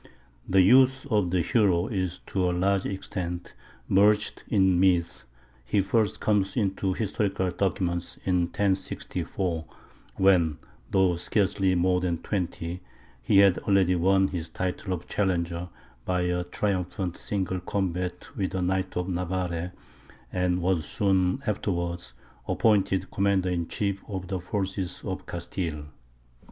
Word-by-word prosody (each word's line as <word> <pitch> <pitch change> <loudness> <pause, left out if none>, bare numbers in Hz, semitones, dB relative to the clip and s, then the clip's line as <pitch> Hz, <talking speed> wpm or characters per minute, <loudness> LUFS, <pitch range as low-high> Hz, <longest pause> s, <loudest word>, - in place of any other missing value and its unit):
The 95 0 +5
youth 130 +6 +5
of 105 -5 +2
the 90 0 +2
hero 95 -6 +3
is, 95 -5 -2
to 95 -2 0
a - - 0
large 100 +1 +1
extent, 90 -2 -5 0.3
merged 105 +2 +3
in 95 -4 +3
myth; 90 -3 +2 0.4
he 80 +12 +1
first 105 +2 +1
comes 100 -2 +1
into 95 -3 0
historical 100 -3 -1
documents 85 -1 -1
in 90 -2 +2
1064, 95 -2 -2 0.5
when, 90 -6 +3 0.3
though 95 -2 +3
scarcely 95 0 +1
more 90 +1 +2
than 90 -2 0
twenty, 90 -1 -3 0.4
he 80 +11 +3
had 100 -2 +6
already 95 -3 +3
won 95 +2 +3
his 85 -3 -4
title 95 +1 -3
of 90 -1 -3
Challenger 90 -3 -1 0.3
by 90 +3 0
a 90 0 0
triumphant 90 -1 -2
single 95 -2 -2
combat 90 -1 -3
with 95 -1 -2
a 95 - 0
knight 95 +1 -1
of 90 0 -1
Navarre, 90 -1 -2 0.6
and 90 -1 0
was 90 -3 +1
soon 95 - +1
afterwards 85 - -2 0.3
appointed 95 -4 +2
commander 100 -2 +1
in 85 -2 -1
chief 100 -1 -2
of 95 -3 -5
the 95 - -2
forces 95 -1 -3
of 95 -2 -5
Castile. 85 -4 -4
95 Hz, 130 wpm, -27 LUFS, 90-100 Hz, 0.6 s, had